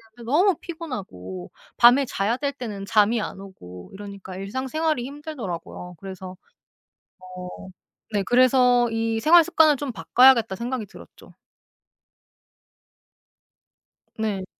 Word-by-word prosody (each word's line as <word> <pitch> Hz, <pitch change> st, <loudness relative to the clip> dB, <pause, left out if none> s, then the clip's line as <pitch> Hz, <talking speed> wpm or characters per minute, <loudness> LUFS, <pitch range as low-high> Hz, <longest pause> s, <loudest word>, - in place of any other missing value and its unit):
되는데 235 Hz, -1 st, -10 dB
너무 365 Hz, +4 st, +4 dB
피곤하고 190 Hz, -, -8 dB, 0.3 s
밤에 245 Hz, +4 st, +6 dB
자야 210 Hz, +1 st, -1 dB
될 280 Hz, 0 st, -2 dB
때는 215 Hz, -7 st, -7 dB
잠이 215 Hz, +2 st, +2 dB
안 195 Hz, -, -6 dB
오고 90 Hz, -, -12 dB
이러니까 200 Hz, -2 st, -9 dB
일상생활이 260 Hz, +6 st, -2 dB
힘들더라고요. 235 Hz, -, -7 dB
그래서 190 Hz, -1 st, -8 dB, 0.9 s
어 185 Hz, 0 st, -9 dB, 0.6 s
네. 205 Hz, -, +1 dB
그래서 250 Hz, -1 st, +4 dB
'이 225 Hz, 0 st, -1 dB
생활 335 Hz, +4 st, +7 dB
습관을 320 Hz, -3 st, +4 dB
좀 280 Hz, -1 st, -5 dB
바꿔야겠다.' 225 Hz, +5 st, +4 dB
생각이 235 Hz, -1 st, -4 dB
들었죠. -, -, -16 dB, 2.8 s
네. 205 Hz, -4 st, -3 dB
225 Hz, 260 characters per minute, -23 LUFS, 190-265 Hz, 2.8 s, 생활